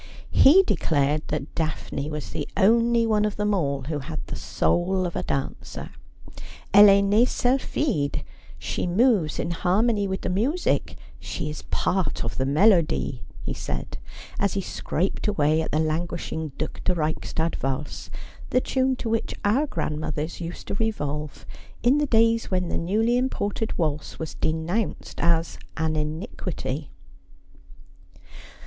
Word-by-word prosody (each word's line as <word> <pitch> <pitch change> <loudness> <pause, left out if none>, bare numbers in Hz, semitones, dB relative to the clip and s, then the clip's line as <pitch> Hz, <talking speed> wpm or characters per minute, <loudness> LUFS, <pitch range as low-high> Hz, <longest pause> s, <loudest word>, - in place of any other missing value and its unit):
He 360 +8 +7
declared 150 - +1
that 150 -1 -3
Daphne 155 -2 -3
was 150 -1 -5
the - - -3
only 230 +3 +4
one 215 -2 +2
of 210 -1 0
them 210 0 0
all 140 -7 0
who 150 +2 -3
had 155 +3 -5
the - - -5
soul 185 +2 0
of 175 - -4
a - - 0
dancer. 135 -1 -4 0.4
'■ - - -11 0.3
Elle 205 +1 +10
est 200 0 +6
nee 210 +4 +4
sylpldde. 250 - 0 0.3
She - - -3
moves 195 - +3
in 170 - -2
harmony 200 +5 +2
with 190 0 -3
the - - -2
music; 250 - 0 0.2
she 150 - -4
is 155 - -7
a - - -21
part 190 -1 0
of 115 - -4
the 130 - +1
melody,' 150 - +3 0.2
he - - -2
said, - - -5 0.4
as 200 -1 +1
he 200 - -1
scraped 185 +1 -2
away 155 -5 +2
at - - -3
the 150 - +1
languishing 160 0 -2
Due 155 - -1
de 180 - +2
Reichstadt 160 +1 -1
valse, 135 +2 -3 0.4
the 255 - +3
tune 260 0 +1
to 250 - -5
which 225 0 -1
our 255 +9 +3
grandmothers 155 - -3
used 170 +1 -6
to - - -1
revolve 150 -9 -3 0.4
in 255 +5 +4
the 295 - +1
days 230 -1 +3
when 180 -2 0
the - - -1
newly 220 +8 +2
imported 225 -4 -1
waltz 150 -3 -2
was 160 - -5
denounced 165 +7 -2
as 170 0 +1 0.2
an 160 0 0
iniquity. 155 - -4
175 Hz, 150 wpm, -25 LUFS, 155-220 Hz, 0.4 s, Elle